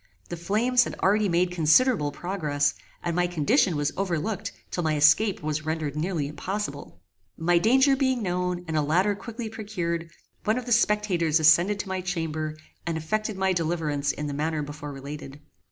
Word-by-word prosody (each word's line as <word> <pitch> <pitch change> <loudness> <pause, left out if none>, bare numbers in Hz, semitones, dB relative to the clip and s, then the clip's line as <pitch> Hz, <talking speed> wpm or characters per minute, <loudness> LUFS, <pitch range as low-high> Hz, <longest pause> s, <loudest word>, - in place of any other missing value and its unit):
The 175 - -3
flames 225 +9 +2
had - - -5
already 205 +1 +2
made 175 +1 +2
considerable 170 - +3
progress, 150 -6 -1 0.3
and 170 -1 -1
my 175 0 +2
condition 175 - +2
was 145 0 0
overlooked 195 +2 -2 0.2
till 175 - -2
my 155 -1 +1
escape 160 +6 +4
was 155 0 -2
rendered 155 -2 -3
nearly 155 -2 -1
impossible. 145 - -5 0.4
My 170 +1 +3
danger 265 +7 +4
being 260 -3 0
known, 180 -1 -2
and 160 - -3
a 155 - +3
ladder 180 +8 +2
quickly 225 +3 -7
procured, 175 -7 -4 0.3
one 215 +3 +1
of 250 - -4
the 245 - -5
spectators 210 -8 +2
ascended 170 +6 +5
to - - -11
my 190 0 -2
chamber, 160 -4 -3 0.3
and 165 -1 -2
effected 215 +6 -2
my 190 0 +2
deliverance 155 -4 -1
in 150 - -5
the 145 - -3
manner 155 +1 -1
before 145 0 -7
related. 140 0 -8
175 Hz, 170 wpm, -26 LUFS, 155-205 Hz, 0.4 s, ascended